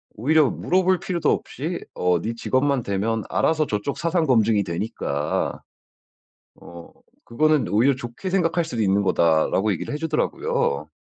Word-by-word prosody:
오히려 145 +5 +3
물어볼 185 -1 +1
필요도 175 -3 0
없이 - - -3 0.2
"어 90 -1 +1
네 115 - -3
직업만 130 +2 0
대면 105 +3 -1
알아서 155 -1 +1
저쪽 105 +6 -3
사상 170 0 0
검증이 115 -6 +3
되니까 85 -5 -3 0.9
어 85 -1 -12 0.4
그거는 155 +3 +2
오히려 125 +6 +3
좋게 120 +9 -6
생각할 175 -2 +1
수도 120 -9 -3
있는 100 0 +2
거다."라고 85 +4 +2
얘기를 90 - -5
해주더라고요. 150 - -1
120 Hz, 325 characters per minute, -23 LUFS, 100-155 Hz, 0.9 s, 오히려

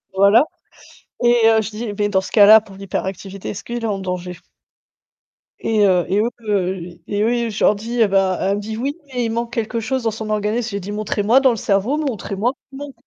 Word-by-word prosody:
Voilà 200 +7 +5 0.8
et, 240 -1 +5
heu, 225 -1 +4
je 220 - -5
dis: 215 0 -5
«Beh, 205 0 -1
dans 190 -2 +2
ce 190 - -9
cas-là 215 +1 +8
pour 205 -3 -15
l'hyperactivité, 195 0 -5
est-ce 200 - -6
qu'il 240 0 -5
est - - 0
en 200 -2 -2
danger?» 180 -1 -4 1.3
Et, 220 -2 +1
heu, 180 -2 +2
et 195 - +1
eux 225 +3 +1
heu, 195 -4 0 0.3
et 205 0 -1
eux, 235 +1 0
je 210 - -3
leur - - +6
dis 230 +4 -5
eh 220 - +5
bah 190 -2 +2
elle 195 +1 0
me - - -4
dit: 220 +1 -5
«Oui, 275 +5 -2
mais 250 -3 -2
il 225 - -2
manque 235 +1 -3
quelque 230 0 -2
chose 255 +3 -2
dans 225 - +1
son 220 0 -6
organisme», 215 +3 -1
j'ai 200 - -3
dit: 200 +2 -7
«Montrez-moi 210 +3 +2
dans 270 -1 +4
le 240 - +1
cerveau, 205 +6 0
montrez-moi 235 - -2 0.2
qu'il 270 - -11
manque 285 0 -8
215 Hz, 225 wpm, -20 LUFS, 200-235 Hz, 1.3 s, cas-là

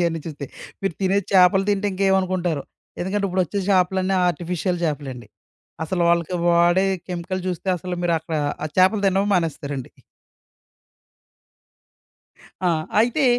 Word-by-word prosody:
ఇయన్నీ 165 -2 0
చూస్తే. 150 -3 -6 0.4
మీరు 195 -4 -1
తినే 190 +1 +3
చేపలు 190 0 +5
తింటే 205 0 0
ఇంకేమనుకుంటారో! 185 -5 +1 0.4
ఎందుకంటే 200 +3 -1
ఇప్పుడొచ్చే 185 +1 -1
చేపలన్నీ 190 0 +2
ఆర్టిఫిషియల్ 175 +1 -1
చేపలండి. 135 -7 -4 0.6
అసలు 175 +2 -1
వాళ్ళకి 170 +1 +1
వాడే 175 +3 +4 0.2
కెమికల్ 180 +1 -4
జూస్తే 180 +1 -3
అసలు 180 +2 -4
మీరక్కడ 165 -2 0 0.3
ఆ - - -2
చేపలు 190 +3 +4
తినడమే 195 +1 +2
మానేస్తారండి. 145 -6 -2 2.8
ఆ! - - +4 0.3
అయితే 245 +6 +2
180 Hz, 110 wpm, -22 LUFS, 165-190 Hz, 2.8 s, చేపలు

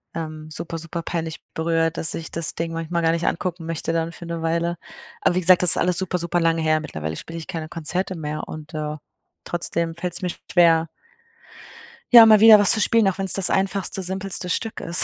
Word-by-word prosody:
Ähm, 155 -1 -7
super, 165 +2 -5
super 165 +1 -6
peinlich 165 -2 -5
berührt, 165 0 -1
dass 160 - +1
ich 165 - -7
das 165 -1 -2
Ding 165 0 -4
manchmal 165 +1 -3
gar 165 -1 +2
nicht 170 +1 -2
angucken 175 -1 -3
möchte 165 0 -3
dann 165 0 -2
für 170 - -11
'ne 170 -1 -5
Weile. 170 +1 -1 0.4
Aber - - +1
wie 185 - +1
gesagt, 180 +1 +5
das 175 - +7
ist - - +5
alles 180 -1 +1
super, 185 -1 0
super 170 +1 -1
lange 165 -1 +1
her, 155 0 +1
mittlerweile 80 - -6
spiele 165 - -8
ich 160 - -10
keine 165 -4 -5
Konzerte 175 +4 -3
mehr 155 -2 -5
und, 155 +2 -10
äh, 150 -1 -4 0.5
trotzdem 170 -1 -2
fällt 175 +1 -4
es 175 - +1
mir 180 - -2 0.2
schwer 165 -2 +4 1.3
ja, 235 -2 +10
mal 215 -1 +6
wieder 220 0 +9
was 205 -2 +6
zu 220 - +3
spielen, 230 -3 +3
auch 190 - -1
wenn 195 - -1
es 190 - +3
das 195 -2 +1
einfachste, 195 0 -1
simpelste 190 0 -1
Stück 225 +5 -3
ist. 170 +1 +1
170 Hz, 220 wpm, -22 LUFS, 165-180 Hz, 1.3 s, ja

